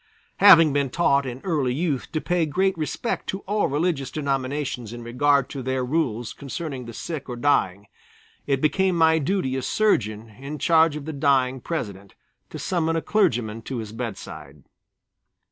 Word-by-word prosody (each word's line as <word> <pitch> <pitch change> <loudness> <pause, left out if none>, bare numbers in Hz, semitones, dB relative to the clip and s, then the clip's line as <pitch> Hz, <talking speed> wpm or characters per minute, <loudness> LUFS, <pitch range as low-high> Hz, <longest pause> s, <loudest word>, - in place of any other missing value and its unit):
Having 165 -7 +8
been 140 -2 +1
taught 140 -2 +2
in 125 +1 -6
early 145 -8 0
youth 150 -4 -2
to 155 - -1
pay 175 0 0
great 190 +5 +1
respect 165 +8 -3
to 195 - -3
all 205 +2 0
religious 145 -2 -1
denominations 135 -4 -3
in 120 0 -8
regard 135 +3 +2
to 140 - -5
their 130 0 -1
rules 125 -6 -1
concerning 140 -2 -6
the 115 - -8
sick 140 +4 -6
or 125 - -4
dying, 105 -7 +1 0.6
it 135 -2 +1
became 180 +4 +2
my 160 0 +4
duty 150 -4 -1
as 130 - -3
surgeon 110 - +1
in 140 +3 -6
charge 160 +1 +4
of 150 -2 -6
the 160 - -5
dying 135 -2 +2
President 100 - -5 0.3
to - - -7
summon 165 -4 -1
a 165 - 0
clergyman 120 - +1
to 130 +3 -5
his 110 -2 -6
bedside. 95 - -7
140 Hz, 165 wpm, -24 LUFS, 125-165 Hz, 0.6 s, Having